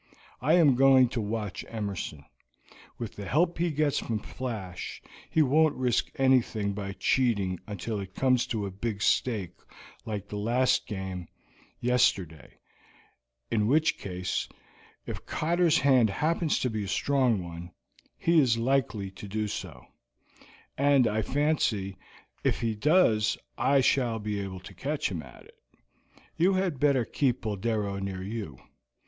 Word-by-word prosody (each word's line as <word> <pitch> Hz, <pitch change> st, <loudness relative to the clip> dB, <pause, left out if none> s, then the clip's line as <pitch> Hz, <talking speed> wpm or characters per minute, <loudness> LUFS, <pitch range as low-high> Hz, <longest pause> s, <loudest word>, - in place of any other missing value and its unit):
I 155 Hz, +7 st, +4 dB
am 160 Hz, -6 st, +6 dB
going 130 Hz, -1 st, +6 dB
to 120 Hz, -, -2 dB
watch 105 Hz, -2 st, -4 dB
Emerson. 100 Hz, -9 st, -5 dB, 0.7 s
With 115 Hz, -3 st, -6 dB
the 100 Hz, -, -6 dB
help 170 Hz, +4 st, +1 dB
he 175 Hz, 0 st, +2 dB
gets 150 Hz, -2 st, +1 dB
from 115 Hz, -, -2 dB
Flash, 105 Hz, -5 st, -6 dB, 0.3 s
he 160 Hz, -, +3 dB
won't 150 Hz, +3 st, +3 dB
risk 125 Hz, -2 st, 0 dB
anything 120 Hz, -6 st, +2 dB
by 100 Hz, -1 st, -5 dB
cheating 100 Hz, -8 st, +1 dB
until 105 Hz, +1 st, -4 dB
it 95 Hz, -1 st, -8 dB
comes 130 Hz, -2 st, +2 dB
to 110 Hz, -4 st, -2 dB
a 100 Hz, -, -4 dB
big 100 Hz, +1 st, -3 dB
stake 105 Hz, -8 st, +1 dB, 0.5 s
like 105 Hz, -3 st, -5 dB
the 105 Hz, 0 st, -5 dB
last 120 Hz, +5 st, +2 dB
game 95 Hz, -4 st, -5 dB, 0.5 s
yesterday, 100 Hz, -, 0 dB, 0.9 s
in 105 Hz, -2 st, +2 dB
which 155 Hz, +6 st, +2 dB
case, 90 Hz, -1 st, -3 dB, 0.6 s
if -, -, -6 dB
Cotter's 170 Hz, 0 st, +2 dB
hand 130 Hz, -5 st, +4 dB
happens 155 Hz, -, 0 dB
to 125 Hz, -, 0 dB
be 110 Hz, -2 st, -3 dB
a -, -, -7 dB
strong 125 Hz, -3 st, +1 dB
one, 85 Hz, 0 st, -8 dB, 0.5 s
he 165 Hz, 0 st, +3 dB
is 125 Hz, -6 st, +3 dB
likely 115 Hz, -5 st, 0 dB
to 100 Hz, +1 st, -10 dB
do 105 Hz, +2 st, -2 dB
so, 80 Hz, -11 st, -7 dB, 0.9 s
and 140 Hz, -2 st, +5 dB
I 110 Hz, -1 st, +1 dB
fancy 115 Hz, -8 st, 0 dB, 0.5 s
if -, -, +1 dB
he 115 Hz, -1 st, 0 dB
does 110 Hz, -, +3 dB, 0.2 s
I 140 Hz, -, +3 dB
shall 125 Hz, -3 st, +2 dB
be 105 Hz, -1 st, -3 dB
able 95 Hz, -2 st, -6 dB
to 95 Hz, -, -11 dB
catch 140 Hz, -, -2 dB
him 85 Hz, -4 st, -3 dB
at 65 Hz, -4 st, -14 dB
it. -, -, -21 dB, 0.8 s
You 180 Hz, +4 st, +4 dB
had 185 Hz, -7 st, 0 dB
better 140 Hz, -4 st, +3 dB
keep 130 Hz, -1 st, 0 dB
Boldero 105 Hz, -1 st, -2 dB
near 95 Hz, -1 st, -4 dB
you. 100 Hz, -, -5 dB
115 Hz, 145 wpm, -28 LUFS, 100-135 Hz, 0.9 s, am